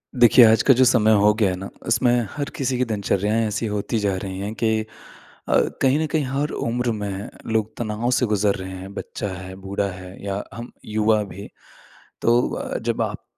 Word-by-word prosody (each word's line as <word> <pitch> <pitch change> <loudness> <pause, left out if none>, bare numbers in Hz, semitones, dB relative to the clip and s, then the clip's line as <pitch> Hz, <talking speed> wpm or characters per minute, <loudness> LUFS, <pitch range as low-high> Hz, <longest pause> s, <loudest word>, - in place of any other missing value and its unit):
देखिए 120 0 +7
आज 110 0 +5
का 135 - +6
जो 130 - +4
समय 115 -3 +4
हो 105 +1 +5
गया 105 -4 +4
है 90 - -2
ना, 95 +2 -7 0.2
उसमें 120 0 +2
हर 145 -1 -4
किसी 130 -2 -1
की 125 - +1
दिनचर्याएँ 105 0 0
ऐसी 105 +2 -2
होती 105 +2 -2
जा 100 -2 0
रही 95 -1 -5
हैं 100 +2 -4
कि 110 -1 +1 0.7
अ, - - +2 0.3
कहीं 135 +2 +3
न 160 - +1
कहीं 155 -1 0
हर 140 +3 -1
उम्र 120 +1 -1
में 100 -2 -4 0.2
लोग 110 -1 0
तनाव 115 +1 -2
से 125 0 +2
गुज़र 105 -2 +1
रहे 95 0 -6
हैं 95 +2 -9
बच्चा 100 - -5
है, 95 +1 -8
बूढ़ा 100 +1 -3
है 95 +1 -11
या 100 0 -3
हम 115 +1 -8
युवा 110 0 +2
भी। 100 0 -9 0.7
तो 120 +1 +3
अ, - - -4
जब - - -2
आप - - -3
110 Hz, 200 wpm, -22 LUFS, 100-120 Hz, 0.7 s, देखिए